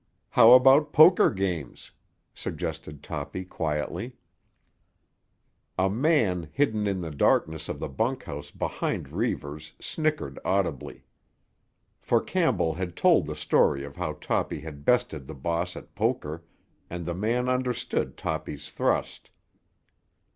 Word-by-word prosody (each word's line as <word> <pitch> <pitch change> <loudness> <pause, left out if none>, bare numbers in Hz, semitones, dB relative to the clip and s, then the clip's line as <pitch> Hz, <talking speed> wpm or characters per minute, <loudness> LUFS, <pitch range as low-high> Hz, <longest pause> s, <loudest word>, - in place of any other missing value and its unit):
"How 115 +2 +8
about 135 +4 +6
poker 175 +4 +7
games?" 90 - -4 0.4
suggested 75 -2 -6
Toppy 80 +4 -5
quietly. 80 +9 -3 1.6
A 95 +1 +2
man 110 - +1
hidden 110 -7 +1
in 95 -2 -1
the 80 -2 -5
darkness 80 +2 +1
of - - -4
the - - -3
bunkhouse 70 - -3
behind - - -3
Reivers 75 +1 -3
snickered 155 - -2
audibly; 90 -8 -1 1.0
for - - +2
Campbell 80 - +1
had 90 0 -5
told - - +4
the - - -4
story 70 - +2
of 70 - -11
how - - -3
Toppy - - -2
had 75 -2 -10
bested 125 - +1
the 80 - -8
boss 85 +5 -2
at - - -11
poker 80 +3 -2 0.5
and 85 0 -5
the 85 - -2
man 115 +7 0
understood 125 -2 -1
Toppy's 80 -2 -4
thrust. - - -1
90 Hz, 120 wpm, -27 LUFS, 75-120 Hz, 1.6 s, How